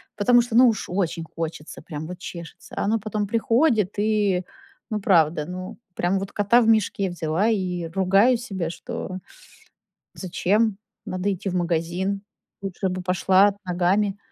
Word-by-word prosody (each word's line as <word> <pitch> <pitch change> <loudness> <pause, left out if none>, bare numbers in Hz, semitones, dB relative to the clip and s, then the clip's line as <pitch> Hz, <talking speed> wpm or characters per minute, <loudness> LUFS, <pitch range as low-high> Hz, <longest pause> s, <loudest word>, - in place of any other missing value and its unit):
Потому 240 +4 +5
что 235 -1 -4
ну, 250 +1 +8
уж 215 - -2
очень 175 -3 -1
хочется, 160 -2 -5
прям 155 -1 -7
вот 180 0 -7
чешется. 170 -3 -9
А - - 0
оно 220 +2 +1
потом 210 -1 -3
приходит 225 - +2
и, 205 -4 +1 0.5
ну, 210 - 0
правда, 160 -5 +3
ну, 185 +2 -7 0.2
прям 180 +3 +1
вот 195 - -6
кота 210 +4 +4
в 225 - +1
мешке 205 -3 +2
взяла 170 +5 0
и 180 -5 -1
ругаю 195 +7 +3
себя, 190 -8 -4
что 185 +1 -6 1.0
зачем 200 +3 0 0.3
надо 185 +2 -1
идти 190 +2 -4
в - - -4
магазин? 175 +3 -1 0.4
Лучше 190 0 -2
бы 185 0 -3
пошла 190 +2 +3
ногами. 190 +3 +1
190 Hz, 150 wpm, -24 LUFS, 175-210 Hz, 1.0 s, ну